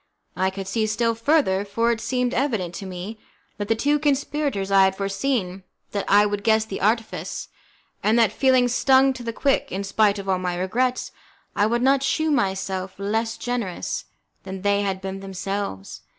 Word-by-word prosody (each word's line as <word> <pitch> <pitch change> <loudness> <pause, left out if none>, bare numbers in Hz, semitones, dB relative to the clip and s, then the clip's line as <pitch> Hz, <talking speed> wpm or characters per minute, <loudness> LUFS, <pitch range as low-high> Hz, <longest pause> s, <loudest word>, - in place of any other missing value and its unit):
I 190 +1 +1
could 190 0 -6
see 215 +2 0
still 230 +2 +1
further, 230 -5 +2
for 230 +4 +1
it 225 -1 -2
seemed 250 0 0
evident 220 -10 -1
to 195 +2 -6
me 190 +4 -7 0.4
that 205 - -2
the 225 - +2
two 290 +6 +1
conspirators 285 -7 0
had 190 -1 +4
foreseen 195 -1 -1 0.3
that 200 -1 -2
I 205 +1 +6
would 205 -1 -2
guess 220 -1 +3
the 200 -3 -6
artifice, 225 +2 -1 0.5
and 220 +2 +3
that, 230 -2 +4
feeling 260 -2 +3
stung 265 +2 +4
to 255 - -9
the 230 -1 -3
quick, 275 +4 0
in 195 +2 -3
spite 205 +1 +2
of 195 -1 -7
all 190 -1 +1
my 180 -1 -2
regrets, 245 +8 -1 0.4
I 205 - +3
would 235 +2 0
not 270 +1 +4
shew 310 +4 +1
myself 190 -6 -1
less 225 +3 -1
generous 245 - -3 0.4
than 190 0 -7
they 200 0 +2
had 195 -2 -2
been 190 0 -5
themselves. 195 - -5
210 Hz, 180 wpm, -23 LUFS, 195-245 Hz, 0.5 s, I